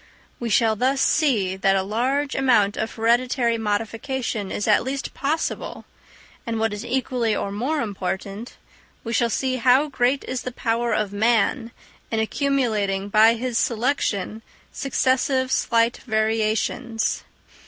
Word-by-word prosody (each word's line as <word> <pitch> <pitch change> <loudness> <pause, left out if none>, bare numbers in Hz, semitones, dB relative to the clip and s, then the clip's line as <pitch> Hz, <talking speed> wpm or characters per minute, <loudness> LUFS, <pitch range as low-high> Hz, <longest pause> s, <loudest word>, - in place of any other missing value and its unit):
We 235 - -3
shall 220 +1 +3
thus 260 +5 +1
see 225 - +2
that 195 0 +2
a 190 - +1
large 260 +8 -1
amount 230 -7 +3
of 220 - -3
hereditary 235 +1 +1
modification 225 +1 -2
is 205 - -2
at 210 - +5
least 270 +2 -4
possible; 305 +4 -3 0.6
and, 230 -1 -3
what 225 -1 0
is 210 +2 -5
equally 245 -2 -1
or 200 - -3
more 265 +9 -1
important, 200 +1 -5 0.5
we 230 - -4
shall 235 0 +2
see 255 +3 -1
how 260 +5 +4
great 260 0 +1
is 255 -1 -4
the 255 - -5
power 235 0 -1
of 210 -2 -1
man 230 +3 +1 0.4
in 225 - -1
accumulating 220 -6 0
by 220 +2 +5
his 245 0 -1
selection 225 -3 -1 0.3
successive 260 -1 +1
slight 230 -1 +2
variations. 220 +1 -1
230 Hz, 135 wpm, -23 LUFS, 215-255 Hz, 0.6 s, at